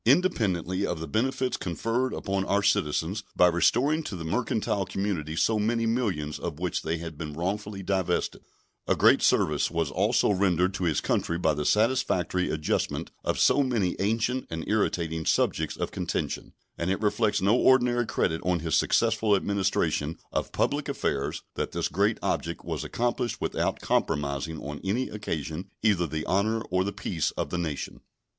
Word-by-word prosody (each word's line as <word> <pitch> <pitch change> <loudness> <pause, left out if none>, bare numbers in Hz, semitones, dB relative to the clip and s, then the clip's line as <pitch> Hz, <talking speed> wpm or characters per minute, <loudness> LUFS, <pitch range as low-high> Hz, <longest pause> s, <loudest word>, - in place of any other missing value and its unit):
Independently 105 - +2
of 90 -4 -1
the 80 - -5
benefits 130 - 0
conferred 115 +9 -1
upon 95 -1 -2
our 100 +1 +1
citizens 85 +4 +1
by 90 - +6
restoring 120 - +3
to 110 - -6
the 85 - -6
mercantile 105 +1 0
community 95 -5 -3
so 110 +5 +2
many 115 +2 +1
millions 100 - -1
of - - -4
which 90 0 -2
they 80 +1 -2
had 80 -2 -7
been 75 -2 -5
wrongfully 95 +4 -3
divested, 95 -2 -1 0.5
a - - +3
great - - +5
service - - +3
was 85 -1 -1
also 105 +5 +2
rendered 95 -1 +2
to 95 -1 -2
his 80 -3 +1
country 85 - 0
by 80 -3 +2
the 75 0 -3
satisfactory 105 -6 +2
adjustment 75 0 -1
of - - 0
so - - +4
many 115 -9 0
ancient 115 +5 0
and 80 -1 -5
irritating 85 -6 0
subjects - - +1
of - - -3
contention; - - -3 0.3
and 85 - -1
it 95 - 0
reflects 105 0 +1
no 100 +5 +3
ordinary 125 -2 +4
credit 80 - 0
on 90 -2 +1
his 80 -1 -2
successful 110 -2 +3
administration 95 -6 0
of - - -2
public - - 0
affairs 70 0 -2
that - - -3
this - - 0
great - - +1
object 85 -1 -2
was - - -3
accomplished 120 0 -1
without - - -1
compromising 75 +1 -1
on 75 0 -6
any 110 +7 0
occasion 85 -3 -4
either 100 -6 +3
the 80 +1 -4
honor 110 +4 +1
or 90 0 +2
the 100 - -2
peace 85 -5 -2
of - - -2
the 90 - -1
nation. 80 -5 -4
95 Hz, 165 wpm, -27 LUFS, 80-110 Hz, 0.5 s, by